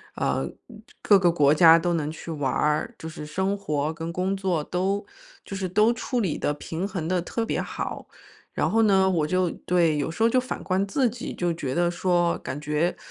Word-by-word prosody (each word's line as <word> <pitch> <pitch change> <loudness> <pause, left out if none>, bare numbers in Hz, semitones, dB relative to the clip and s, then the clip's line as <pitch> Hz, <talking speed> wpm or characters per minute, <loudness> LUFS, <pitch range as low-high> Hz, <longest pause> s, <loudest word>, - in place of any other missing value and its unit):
呃， - - 0 0.3
嗯， 220 -2 -12 0.2
各 200 -2 +5
个 180 -2 +4
国 150 -4 +4
家 165 +1 +7
都 175 +1 0
能 150 -2 -1
去 160 +1 -7
玩 145 -4 -1
儿， 155 +10 0
就 160 - -7
是 155 -1 -8
生 190 +6 -1
活 155 -5 -2
跟 165 +1 -5
工 185 +2 -1
作 185 -5 -1
都 195 +5 -1 0.4
就 - - -9
是 190 -1 -2
都 210 +5 +3
处 245 +1 -2
理 180 -8 -1
得、 145 - -1
平 165 +5 -4
衡 180 -5 -4
得 180 -1 +1
特 225 +6 -3
别 - - -1
好。 - - -5 0.5
然 - - 0
后 225 - +3
呢， 190 -3 +4
我 165 -5 +1
就 185 +1 +1
对， 170 -4 +1
有 145 - -1
时 170 +7 -2
候 230 - +5
就 255 - +3
反 255 0 -5
观 190 +1 0
自 245 +5 +1
己， 235 +1 -6
就 175 -1 -1
觉 135 -5 -4
得 175 0 +2
说 175 -1 +1
感 130 +3 -6
觉 150 +4 0
175 Hz, 235 characters per minute, -25 LUFS, 160-195 Hz, 0.5 s, 家